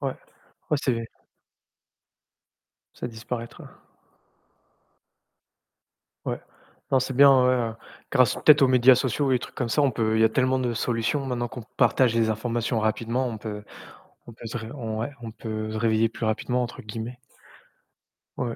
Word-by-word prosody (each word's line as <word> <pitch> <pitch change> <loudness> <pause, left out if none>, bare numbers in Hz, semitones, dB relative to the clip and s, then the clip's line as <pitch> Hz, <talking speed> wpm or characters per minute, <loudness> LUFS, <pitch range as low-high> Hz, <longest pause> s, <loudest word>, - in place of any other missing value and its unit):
Ouais, 135 -2 -3 0.5
ouais 150 - +3
c'est 130 - +2 2.0
Ça - - -5
disparaîtra. 115 0 -7 2.6
Ouais. - - -2 0.5
Non, 135 - +5
c'est 130 +1 -3
bien 140 +2 +8
en 130 -2 +5
vrai, 130 0 +4
heu, 115 -2 -2 0.4
grâce 130 -1 +4
peut-être 150 -1 +6
aux 135 - +6
médias 130 0 +6
sociaux 135 +2 0
et 130 - +4
des - - +1
trucs - - -10
comme 120 -3 -2
ça, 145 - +2
on 140 -2 +3
peut 110 -1 0
il - - +3
y - - +6
a 110 - +5
tellement 130 +2 +1
de 125 -2 -1
solutions 120 +4 -1
maintenant 120 -2 -2
qu'on 125 +1 -8 0.2
partage 125 -3 +3
les 115 -1 +2
informations 115 +1 -1
rapidement, 115 +4 0
on 115 -2 -5
peut 105 -1 -6 0.6
on 120 - -10
peut 115 - -11
se 115 - -5
ré 110 -1 -6
on 110 -6 -4
ouais, 130 +6 -3
on 115 - -7
peut 110 -1 -5
se 110 - -4
«réveiller 110 0 +2
plus 115 - -6
rapidement» 125 +3 0
entre 120 - -6
guillemets. 115 +3 -6 1.2
Ouais. 120 -2 -2
120 Hz, 170 wpm, -25 LUFS, 110-130 Hz, 2.6 s, bien